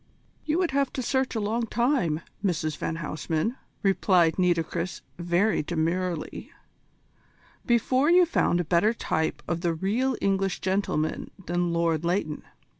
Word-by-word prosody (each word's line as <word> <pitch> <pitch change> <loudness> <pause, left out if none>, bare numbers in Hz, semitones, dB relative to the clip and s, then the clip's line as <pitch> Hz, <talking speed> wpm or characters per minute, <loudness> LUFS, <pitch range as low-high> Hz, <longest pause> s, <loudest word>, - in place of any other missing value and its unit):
"You 310 +1 +1
would 360 -4 +1
have 275 -1 +1
to 260 - -3
search 260 0 0
a - - 0
long 225 +3 -1
time, 235 - +1 0.2
Mrs 160 -5 0
van 160 - -3
Huysman," 160 - -2 0.3
replied 185 -3 +3
Nitocris 175 0 0 0.2
very 175 +5 +2
demurely, 170 +2 -2 1.2
"before 255 +4 +3
you 355 +1 +6
found 175 - +1
a - - +1
better 180 +8 +3
type 160 -7 -1
of 170 -1 -2
the 170 -1 0
real 230 +9 0
English 195 -1 0
gentleman 185 -5 -1 0.2
than 175 0 0
Lord 170 -1 +1
Leighton. 170 -3 -1
185 Hz, 135 wpm, -26 LUFS, 165-235 Hz, 1.2 s, you